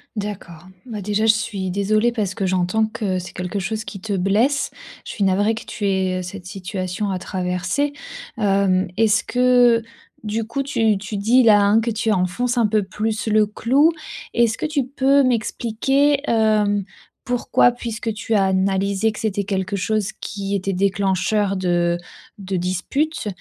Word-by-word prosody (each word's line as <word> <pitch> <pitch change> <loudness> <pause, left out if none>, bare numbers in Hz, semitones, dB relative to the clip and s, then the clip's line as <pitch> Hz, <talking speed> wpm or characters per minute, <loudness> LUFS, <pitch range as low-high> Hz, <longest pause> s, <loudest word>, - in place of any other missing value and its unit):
D'accord, 200 -6 -6 0.2
bah, 215 -4 -6
déjà 210 +2 0
je 220 - +6
suis 195 -3 -3
désolée 215 +4 +1
parce 205 -5 -2
que 195 - -2
j'entends 185 +4 +1
que 210 -4 -2
c'est 180 - -9
quelque 180 +2 -4
chose 215 +3 -3
qui 195 - -8
te 205 +1 -4
blesse. 215 +10 +1 0.3
Je - - -6
suis 200 - -1
navrée 205 +4 +2
que - - -8
tu 205 - -5
aies 185 -1 0
cette 180 0 -8
situation 185 0 -4
à 185 -1 -2
traverser. 185 +10 -2 0.5
Hem, 195 -3 +2
est-ce 220 0 +2
que, 245 -2 +4 0.4
du 215 +1 -2
coup, 275 +4 -3
tu 225 -7 +1
tu 200 +1 -5
dis 240 +5 +4
là, 210 -2 +6
hein, 205 +3 +4
que 230 +1 -1
tu 220 0 0
enfonces 235 +7 -1
un 230 - +4
peu 210 -1 +1
plus 215 +3 -3
le 215 0 +4
clou. 265 +9 +2 0.4
Est-ce 235 -2 +2
que - - -3
tu 295 -4 0
peux 275 +1 +3
m'expliquer, 260 +4 +1
hem, 210 -3 +2 0.4
pourquoi? 245 0 +3
Puisque 230 -2 -4
tu 220 +1 -2
as 195 - +4
analysé 195 +2 +1
que - - -9
c'était 205 -2 -1
quelque 195 0 -2
chose 210 +1 -1
qui 200 -1 -3
était 195 0 -2
déclencheur 195 +1 +1
de 175 -2 +1 0.4
de 195 -1 -4
disputes. 210 - -2
210 Hz, 165 wpm, -21 LUFS, 190-225 Hz, 0.5 s, je